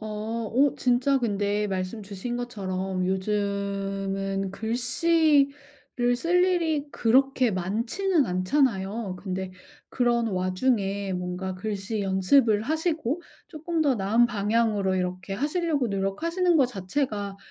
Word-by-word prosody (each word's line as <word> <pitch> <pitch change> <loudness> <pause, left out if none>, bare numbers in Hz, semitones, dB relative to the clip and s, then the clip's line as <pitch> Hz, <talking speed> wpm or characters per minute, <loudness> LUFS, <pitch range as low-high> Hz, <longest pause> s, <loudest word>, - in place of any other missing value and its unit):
어. 215 +1 -4
오 275 +3 +3
진짜 255 +2 +2
근데 205 -3 0
말씀 190 +3 -3
주신 200 +5 -5
것처럼 190 -6 -3
요즘은 195 0 -2
글씨를 275 - +1
쓸 355 +6 +3
일이 320 -5 0
그렇게 260 0 +3
많지는 235 - 0
않잖아요. 195 0 0
근데 190 -1 -4 0.4
그런 240 -2 +1
와중에 195 +1 0
뭔가 180 +1 -4
글씨 205 +2 -3
연습을 205 +4 +3
하시고 315 +1 -1 0.3
쪼끔 320 +1 -3
더 280 -4 +3
나은 220 +4 +3
방향으로 210 -3 +1
이렇게 185 +1 -3
하시려고 295 - 0
노력하시는 330 - 0
거 270 -4 +5
자체가 205 -2 -3
220 Hz, 255 characters per minute, -26 LUFS, 195-270 Hz, 0.4 s, 거